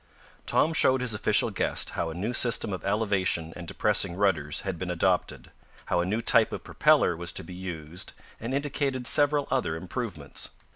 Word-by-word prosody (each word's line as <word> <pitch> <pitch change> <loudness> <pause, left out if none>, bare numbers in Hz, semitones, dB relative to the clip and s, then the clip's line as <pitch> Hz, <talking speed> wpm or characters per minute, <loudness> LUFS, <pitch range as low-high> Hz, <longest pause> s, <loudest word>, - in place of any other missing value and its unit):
Tom 165 - +2
showed 130 -4 +3
his 125 -3 0
official 105 - +3
guest - - 0
how - - -3
a 80 - -7
new 105 +7 -3
system 120 -4 +3
of 95 - -6
elevation 95 -6 0
and 90 -1 -9
depressing 100 -2 +1
rudders 85 -7 0
had 95 -4 -5
been 95 - -4
adopted, 90 +1 -1 0.3
how 90 - 0
a 85 - +1
new 110 +4 -1
type 115 -1 +3
of - - -6
propeller 90 - +3
was 85 +1 -1
to - - -2
be 90 - -10
used 90 -2 -6 0.3
and 115 +3 -5
indicated 140 -2 -2
several 145 +1 +4
other 125 -12 0
improvements. 80 - -5
100 Hz, 180 wpm, -27 LUFS, 85-120 Hz, 0.3 s, several